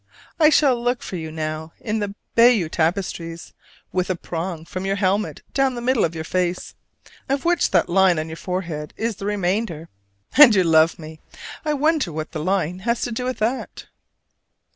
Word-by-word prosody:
I 305 Hz, -2 st, +7 dB
shall 275 Hz, -5 st, +3 dB
look 245 Hz, 0 st, -1 dB
for -, -, -6 dB
you 160 Hz, -2 st, -5 dB
now 155 Hz, 0 st, -5 dB
in 220 Hz, 0 st, -2 dB
the 205 Hz, -1 st, -4 dB, 0.2 s
Bayeux 230 Hz, -8 st, +5 dB
tapestries 165 Hz, 0 st, -2 dB, 0.4 s
with 185 Hz, 0 st, -1 dB
a 185 Hz, -, +1 dB
prong 165 Hz, -1 st, -5 dB
from 185 Hz, +2 st, -6 dB
your 195 Hz, 0 st, 0 dB
helmet 200 Hz, +1 st, -1 dB
down 270 Hz, -2 st, +1 dB
the -, -, -4 dB
middle 245 Hz, 0 st, +1 dB
of 165 Hz, 0 st, -1 dB
your 160 Hz, -, -4 dB
face 180 Hz, +1 st, -2 dB, 0.6 s
of 275 Hz, +2 st, -1 dB
which 345 Hz, -2 st, +2 dB
that 180 Hz, -3 st, +2 dB
line 185 Hz, -1 st, +4 dB
on 155 Hz, +1 st, -2 dB
your 160 Hz, -, -7 dB
forehead 170 Hz, -4 st, -5 dB
is 225 Hz, -2 st, -2 dB
the 200 Hz, -, -5 dB
remainder. 190 Hz, -4 st, -2 dB, 0.5 s
And 275 Hz, -7 st, +9 dB
you 190 Hz, -, +4 dB
love 160 Hz, -1 st, +4 dB
me! 155 Hz, -1 st, -10 dB, 0.4 s
I 300 Hz, -1 st, 0 dB
wonder 300 Hz, -, +1 dB
what 155 Hz, +1 st, -5 dB
the 155 Hz, -, -5 dB
line 185 Hz, -1 st, 0 dB
has 235 Hz, +4 st, -1 dB
to 245 Hz, -, -2 dB
do 250 Hz, +2 st, -3 dB
with 255 Hz, 0 st, -2 dB
that? 235 Hz, +5 st, -3 dB
190 Hz, 185 wpm, -22 LUFS, 165-235 Hz, 0.6 s, And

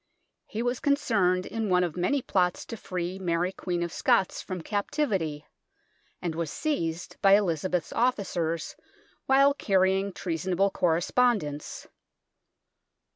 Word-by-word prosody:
He 225 Hz, +2 st, -3 dB
was 245 Hz, +1 st, -1 dB
concerned 200 Hz, -11 st, +2 dB
in 225 Hz, -2 st, -3 dB
one 180 Hz, 0 st, +4 dB
of 170 Hz, -3 st, -2 dB
many 245 Hz, +10 st, 0 dB
plots 180 Hz, -2 st, 0 dB
to -, -, -6 dB
free 185 Hz, -2 st, -4 dB
Mary 175 Hz, 0 st, 0 dB
Queen 175 Hz, -2 st, -3 dB
of 170 Hz, -, -4 dB
Scots 235 Hz, -7 st, +2 dB
from 185 Hz, -2 st, -5 dB
captivity, 195 Hz, -, -1 dB, 0.8 s
and 170 Hz, -2 st, -1 dB
was 165 Hz, -1 st, -3 dB
seized 170 Hz, -, -3 dB
by 195 Hz, 0 st, +6 dB
Elizabeth's 180 Hz, -3 st, 0 dB
officers 180 Hz, -9 st, -1 dB, 0.5 s
while 275 Hz, +1 st, +5 dB
carrying 195 Hz, -5 st, +1 dB
treasonable 185 Hz, +2 st, -1 dB
correspond 195 Hz, +7 st, +2 dB
ence. 145 Hz, 0 st, -7 dB
185 Hz, 125 wpm, -27 LUFS, 170-220 Hz, 0.8 s, by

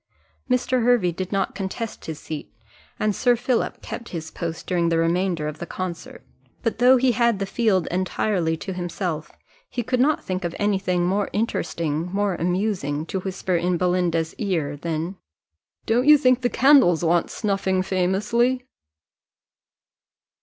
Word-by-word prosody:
Mr. 250 Hz, 0 st, +1 dB
Hervey 235 Hz, -7 st, +3 dB
did 185 Hz, +2 st, -5 dB
not 195 Hz, -1 st, 0 dB
contest 195 Hz, +3 st, -5 dB
his 160 Hz, -2 st, -5 dB
seat, 155 Hz, -7 st, -7 dB, 0.5 s
and 215 Hz, -2 st, +1 dB
Sir 245 Hz, -1 st, +3 dB
Philip 240 Hz, +1 st, -1 dB
kept 235 Hz, -, -7 dB
his 160 Hz, -2 st, -6 dB
post 165 Hz, -2 st, -5 dB
during 170 Hz, -2 st, +1 dB
the 165 Hz, -, +1 dB
remainder 170 Hz, -1 st, +1 dB
of 150 Hz, +1 st, -6 dB
the 170 Hz, -, -6 dB
concert; 180 Hz, -3 st, -6 dB, 0.4 s
but, 230 Hz, -2 st, -1 dB
though 255 Hz, +1 st, +7 dB
he 255 Hz, 0 st, +3 dB
had 235 Hz, -1 st, +2 dB
the 195 Hz, -, -2 dB
field 195 Hz, -3 st, +1 dB
entirely 180 Hz, -2 st, 0 dB
to 190 Hz, -, -5 dB
himself, 175 Hz, -3 st, -4 dB, 0.4 s
he 240 Hz, -, -3 dB
could 255 Hz, +2 st, -1 dB
not 295 Hz, +4 st, +2 dB
think 185 Hz, 0 st, -3 dB
of 175 Hz, -1 st, -3 dB
any 205 Hz, -1 st, +1 dB
thing 180 Hz, -2 st, 0 dB
more 195 Hz, +3 st, 0 dB
interesting, 170 Hz, -6 st, -1 dB
more 200 Hz, 0 st, 0 dB
amusing, 175 Hz, -4 st, -1 dB
to 190 Hz, -, -3 dB
whisper 185 Hz, -1 st, -2 dB
in 175 Hz, +1 st, +1 dB
Belinda's 175 Hz, -2 st, 0 dB
ear, 165 Hz, -8 st, -1 dB
than, 165 Hz, +4 st, -3 dB, 0.7 s
"Don't 245 Hz, +4 st, +2 dB
you 300 Hz, 0 st, +9 dB
think 255 Hz, -2 st, +3 dB
the 245 Hz, -, +1 dB
candles 250 Hz, -, +5 dB
want 170 Hz, +1 st, +2 dB
snuffing 195 Hz, -3 st, 0 dB
famously?" 210 Hz, +8 st, +1 dB
185 Hz, 155 wpm, -23 LUFS, 170-225 Hz, 0.7 s, you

